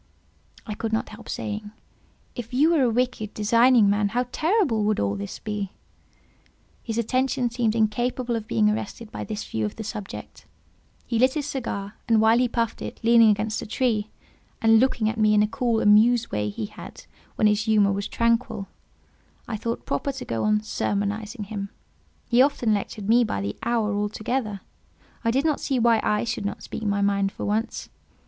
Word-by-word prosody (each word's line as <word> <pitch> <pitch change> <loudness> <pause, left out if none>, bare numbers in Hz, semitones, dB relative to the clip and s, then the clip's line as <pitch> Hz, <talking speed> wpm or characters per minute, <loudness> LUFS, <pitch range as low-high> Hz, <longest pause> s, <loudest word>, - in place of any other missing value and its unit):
I 215 - -4
could 225 +1 -4
not 220 - -1
help 215 +2 -12
saying, 210 0 -4 0.6
"If 245 +1 -7
you 305 +5 +4
were 325 -4 +3
a 250 - +3
wicked, 235 -2 -1
designing 230 +1 +5
man, 205 0 +2
how 245 +4 0
terrible 315 - +1
would 210 0 +1
all 100 0 0
this 100 0 -6
be!" 210 -3 -4 1.1
His 225 -1 -4
attention 255 +1 0
seemed 230 -2 0
incapable 240 +3 0
of 220 -1 -4
being 215 -1 +2
arrested 215 +1 -3
by - - -5
this 215 -1 -5
view 110 - -3
of 105 - -3
the - - -6
subject: 210 -2 -8 0.6
he 230 - -1
lit 260 +3 +4
his 295 -2 -1
cigar, 225 -7 -4
and 225 -1 +5
while 220 +2 +5
he 250 - +3
puffed 230 -1 -2
it, - - -6
leaning 230 -1 +6
against 215 +1 0
a - - -7
tree, 220 -3 0 0.5
and 225 -1 +5
looking 235 -3 +2
at 220 +1 -2
me 215 0 +4
in 210 - +5
a - - +2
cool, 230 0 0
amused 225 +3 +4
way 105 0 -1
he 105 +1 -4
had - - -11 0.3
when - - +1
his 210 0 +3
humour 210 -3 +4
was 200 +1 -2
tranquil, 230 -4 0 0.8
I 230 - -3
thought 230 +2 -4
proper 280 - -1
to 260 -1 -7
go 115 -1 -2
on 210 0 +2
sermonizing 210 +2 -2
him: 200 -1 -5 0.6
he 240 +1 +4
often 255 -5 +2
lectured 205 0 -3
me 235 +2 +5
by 215 - -2
the 100 +1 -3
hour 210 -3 0
together—I 215 0 -5
did 270 +6 +1
not 305 -3 +1
see 270 - -1
why 230 -2 +3
I 210 0 +1
should 230 -2 -3
not - - -6
speak - - -6
my 200 -2 0
mind 200 -1 +1
for - - -6
once. 220 +3 -2
220 Hz, 185 wpm, -24 LUFS, 210-240 Hz, 1.1 s, leaning